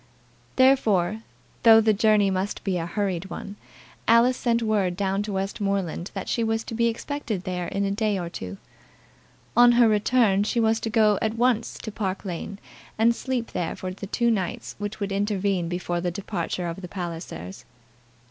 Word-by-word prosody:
Therefore, 220 -7 +3 0.4
though 225 -1 +8
the 220 -1 +3
journey 210 -1 +3
must 190 +2 -2
be 190 -2 0
a 165 - -3
hurried 190 -1 -2
one, 200 - -7 0.5
Alice 235 +3 +5
sent 235 -1 0
word 200 -5 +1
down 195 0 0
to 205 0 -4
Westmoreland 195 -2 -2
that 195 - -4
she 230 - 0
was 225 0 0
to - - -7
be 235 +1 +2
expected 230 -4 -3
there 180 -2 -3
in 200 +3 -1
a 195 - 0
day 210 0 0
or 175 -2 -3
two. 95 - -7 1.0
On 240 +1 +7
her 240 -1 +6
return 210 -1 +3
she 225 +3 0
was 225 0 +2
to 225 - -3
go 215 -2 +3
at 220 0 0
once 235 -1 +1
to 220 - -5
Park 200 -2 -3
Lane, 190 +2 -5 0.4
and 230 +2 +4
sleep 250 -3 -3
there 175 -2 -2
for 185 0 -5
the 200 +1 -8
two 235 +3 +1
nights 190 -5 -2
which 205 +1 -5
would 200 -1 -3
intervene 195 -3 0
before 175 -1 -2
the 180 - 0
departure 180 -1 -3
of 170 +2 -5
the 180 - -6
Pallisers. 165 - -6
205 Hz, 180 wpm, -25 LUFS, 185-225 Hz, 1.0 s, though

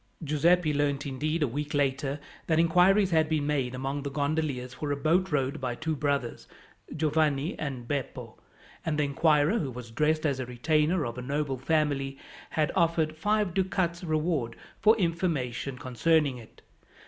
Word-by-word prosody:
Giuseppi 155 +2 +3
learned 145 -1 0
indeed, 150 +4 -1
a - - +2
week 145 +4 -4
later, 140 0 0 0.3
that 160 - +2
inquiries 180 +4 +4
had 160 -1 +3
been 155 -2 0
made 135 -4 -1
among 135 +2 -3
the 140 - -4
gondoliers 140 -3 -2
for 145 +2 -4
a - - +1
boat 170 +6 +1
rowed 135 -2 0
by 125 -2 -2
two 160 +3 -2
brothers, 140 -4 -2 0.5
Giovanni 155 -1 +1
and 130 -5 -4
Beppo; 140 -2 -4 0.4
and 155 -2 -1
the 150 - +2
inquirer, 150 - +3
who 140 - -2
was 120 -2 -8
dressed 155 +6 +1
as 140 -3 0
a 130 - -2
retainer 150 +6 +1
of 120 +1 -5
a - - -4
noble 140 0 -2
family, 140 -2 0 0.3
had 155 -2 0
offered 165 -3 +2
five 205 +2 0
ducats 185 -2 0
reward 155 -7 -1 0.3
for 220 +1 +5
information 160 - -1
concerning 135 +2 +1
it. 110 - -16
150 Hz, 160 wpm, -28 LUFS, 135-160 Hz, 0.5 s, for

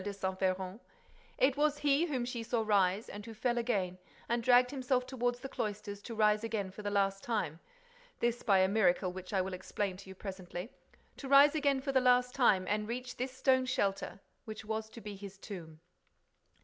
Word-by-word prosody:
de 205 - -3
Saint 190 -1 -3
Véran; 185 +1 -1 0.6
it 265 0 +3
was 295 0 +2
he 290 +3 +2
whom 260 -6 -1
she 240 -1 -4
saw 225 0 -1
rise 200 0 +2
and 205 +1 -8
who 225 - -8
fell 240 +2 0
again 195 -7 -1 0.3
and 235 0 0
dragged 250 +1 +5
himself 255 -2 0
toward 245 -2 -1
the 245 +2 -7
cloisters 205 -4 -4
to 230 - -7
rise 215 0 +3
again 210 -4 -2
for 210 - -9
the 205 - -2
last 195 -1 +1
time—this 245 - -4
by 200 -4 +4
a 190 0 +5
miracle 190 -3 +2
which 185 0 -8
I 195 -2 +2
will 190 0 -4
explain 190 +1 -3
to 195 0 -12
you 190 - -9
presently—to 190 +8 -9
rise 280 +1 +8
again 280 -3 +1
for 275 0 -2
the 265 -1 +3
last 250 0 +4
time 195 -8 +3
and 210 +1 0
reach 250 +2 -5
this 255 +1 -2
stone 260 -1 +3
shelter—which 215 0 -3
was 220 0 -3
to 230 - -11
be 210 -1 -7
his 195 -1 -9
tomb." 170 -6 -9
220 Hz, 190 wpm, -33 LUFS, 195-255 Hz, 0.6 s, rise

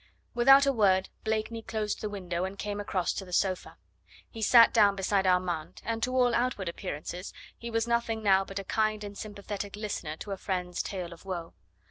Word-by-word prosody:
Without 270 +3 +7
a 275 - +2
word 190 -5 +3
Blakeney 220 +1 -2
closed 220 -2 -3
the 215 - -2
window 180 -3 -3
and 190 +1 -4
came 205 0 -4
across 190 -3 -1
to - - -4
the 180 - -12
sofa; 185 +1 -1 0.5
he 225 - -9
sat 230 +2 +7
down 205 -3 +5
beside 195 0 +1
Armand, 180 -3 0
and 225 0 -2
to 255 +2 -1
all 250 -2 +4
outward 235 -5 0
appearances 175 +1 -5 0.2
he 235 - -7
was 225 0 0
nothing 235 -2 0
now 195 -2 +5
but 195 0 -8
a 195 - -2
kind 215 +1 0
and 205 0 -7
sympathetic 205 -1 -6
listener 200 -7 -4
to 205 - -7
a 195 - -3
friend's 180 -2 -2
tale 180 -3 -5
of 170 - -15
woe. 175 -4 -5
205 Hz, 195 wpm, -29 LUFS, 185-225 Hz, 0.5 s, Without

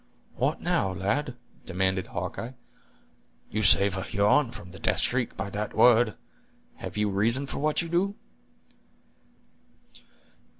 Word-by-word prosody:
"What, - - -1
now, 95 - 0
lad?" 120 +8 -1 0.3
demanded 95 0 -1
Hawkeye; 90 +8 -5 1.0
"you 110 - -1
save 100 -2 +5
a 95 - -3
Huron 105 +8 +2
from 90 -6 -10
the 95 - -12
death - - 0
shriek 125 -2 -1
by 95 +1 -4
that 105 +1 -4
word; 115 -1 +5 0.6
have - - -7
you 105 0 +2
reason 115 +8 +3
for - - -5
what 155 +3 +1
you - - -6
do?" 185 +4 0
105 Hz, 130 wpm, -27 LUFS, 95-130 Hz, 1.0 s, save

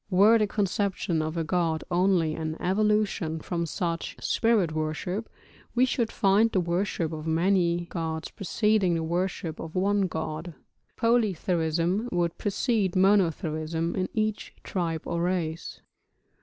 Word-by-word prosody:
Were 205 +4 +6
the 210 - +2
conception 195 -4 -1
of 155 +2 -3
a 165 - 0
god 165 -1 0
only 175 -3 +2
an 160 0 -4
evolution 200 -4 +1
from 170 +1 -3
such 170 0 -3
spirit 225 -8 +2
worship 155 +7 -3 0.5
we 250 +1 +5
should 235 -3 -1
find 200 +3 +3
the 190 - +2
worship 175 -1 -1
of 155 0 -6
many 175 +1 +2
gods 160 -2 -4
preceding 205 -2 +1
the 165 - -1
worship 175 -1 -2
of 160 +1 -7
one 200 +1 +2
god, 160 0 -5 0.4
polytheism 185 -3 +1
would 175 -1 0
precede 205 -2 0
monotheism 165 -4 +1
in 185 -1 -1
each 215 -1 -2
tribe 165 -4 -2
or 170 - -2
race. 170 -2 -2
180 Hz, 130 wpm, -27 LUFS, 165-200 Hz, 0.5 s, Were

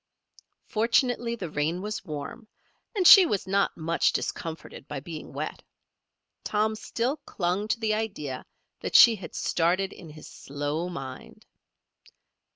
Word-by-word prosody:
Fortunately 235 +1 +1
the 180 -8 -6
rain 155 +4 -1
was 210 +2 -4
warm, 155 +7 -7 0.5
and 380 -3 +1
she 375 0 +10
was 205 - -1
not 195 +1 +1
much 165 +1 +1
discomforted 160 -2 -5
by 145 -1 -5
being 155 +2 -8
wet. - - -5 0.8
Tom 215 +1 0
still 240 +5 -2
clung 190 - -2
to 230 - 0
the 220 -2 +1
idea 195 -12 -4 0.4
that - - -5
she 230 -2 +9
had 180 -6 -10
started 180 +3 0
in 170 - -12
his 155 0 -12
slow 145 +5 -4
mind. 135 -6 -9
185 Hz, 135 wpm, -27 LUFS, 155-220 Hz, 0.8 s, she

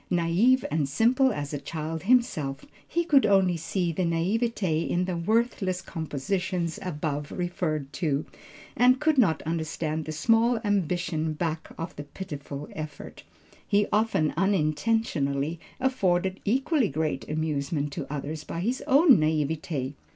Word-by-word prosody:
Naïve 180 +10 +3
and 150 -3 0
simple 255 - +3
as 145 -7 -4
a 145 - -2
child 155 +2 -4
himself, 160 - +1 0.2
he 340 - 0
could 285 -5 +5
only 190 -3 +4
see 170 +2 -1
the 165 - -2
naïveté 180 0 0
in 180 +1 +1
the 180 -1 -2
worthless 195 0 0
compositions 170 +1 -3
above 150 -5 -3
referred 155 -5 -2
to, 150 -3 -1 0.5
and 255 +2 +5
could 310 -3 +2
not 185 -10 +3
understand 160 -1 -2
the 155 - -4
small 225 +9 +3
ambition 175 -5 0
back 160 0 -3
of 165 +1 -5
the 145 - -5
pitiful 145 -2 -7
effort. 155 -2 -8 0.5
He 205 0 +3
often 210 -8 +2
unintentionally 165 -4 0 0.2
afforded 190 -8 +1
equally 270 +3 +2
great 155 -1 -2
amusement 150 -1 -1
to - - -5
others 150 +2 -4
by 165 - -5
his 245 +7 -1
own 280 - +6
naïveté. 155 -2 -1
170 Hz, 135 wpm, -27 LUFS, 155-210 Hz, 0.5 s, own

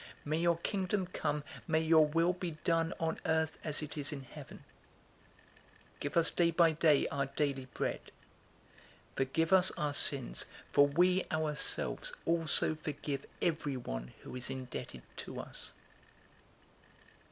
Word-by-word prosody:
May 155 +2 0
your 170 0 +3
Kingdom 190 +2 -1
come. 150 0 -1 0.2
May 160 - +2
your 160 -1 +5
will 165 +4 +2
be 175 -3 -5
done 165 -1 +2
on 160 -1 -1
Earth, 160 -1 0
as 155 0 -1
it 150 - -6
is 145 +1 0
in 140 -3 -5
heaven. 130 - -11 1.3
011:003 - - -28
Give 145 +3 -2
us 165 -1 +5
day 170 -1 +3
by 165 0 +5
day 155 -2 +4
our 140 -1 -1
daily 135 -2 -1
bread. - - -1 1.1
011:004 - - -24
Forgive 160 +6 +1
us 190 0 +6
our 145 -1 0
sins, - - 0 0.3
for 145 - +6
we 180 +5 +3
ourselves 155 - 0
also 165 -1 +3
forgive 145 -2 -4 0.2
everyone 125 - -2
who - - -8
is 125 0 -3
indebted 125 - -6
to - - -6
us. - - -5
155 Hz, 140 wpm, -33 LUFS, 140-165 Hz, 1.3 s, us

